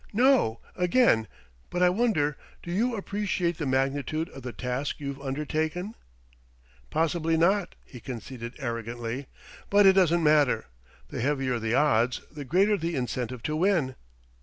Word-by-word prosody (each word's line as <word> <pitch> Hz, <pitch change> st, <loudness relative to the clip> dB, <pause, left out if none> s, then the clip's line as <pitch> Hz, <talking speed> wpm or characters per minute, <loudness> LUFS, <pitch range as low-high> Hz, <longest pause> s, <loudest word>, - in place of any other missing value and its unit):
"No, 245 Hz, -, +3 dB
again.... 180 Hz, -, +3 dB, 0.4 s
But 180 Hz, 0 st, 0 dB
I 180 Hz, -, +6 dB
wonder, 180 Hz, -, +1 dB, 0.3 s
do 170 Hz, -, -6 dB
you 230 Hz, +6 st, +1 dB
appreciate 195 Hz, -4 st, -2 dB
the 150 Hz, -, -2 dB
magnitude 140 Hz, +5 st, 0 dB
of 135 Hz, -, -11 dB
the 125 Hz, -1 st, -5 dB
task 125 Hz, +6 st, -3 dB
you've 140 Hz, -1 st, -5 dB
undertaken?" 155 Hz, +7 st, -2 dB, 1.0 s
"Possibly 165 Hz, 0 st, +1 dB
not," 185 Hz, +3 st, +2 dB
he 125 Hz, -, -11 dB
conceded 120 Hz, 0 st, -7 dB
arrogantly; 120 Hz, 0 st, -4 dB, 0.4 s
"but 205 Hz, 0 st, +5 dB
it 190 Hz, -, +8 dB
doesn't 175 Hz, -3 st, +3 dB
matter. 150 Hz, -7 st, +3 dB, 0.4 s
The -, -, -4 dB
heavier 135 Hz, -2 st, 0 dB
the 115 Hz, +1 st, 0 dB
odds, 125 Hz, -4 st, +2 dB
the 150 Hz, -2 st, -7 dB
greater 195 Hz, +9 st, +3 dB
the 165 Hz, -1 st, -2 dB
incentive 125 Hz, -2 st, -3 dB
to 155 Hz, -, -1 dB
win." 165 Hz, -6 st, +2 dB
150 Hz, 140 wpm, -27 LUFS, 130-180 Hz, 1.0 s, it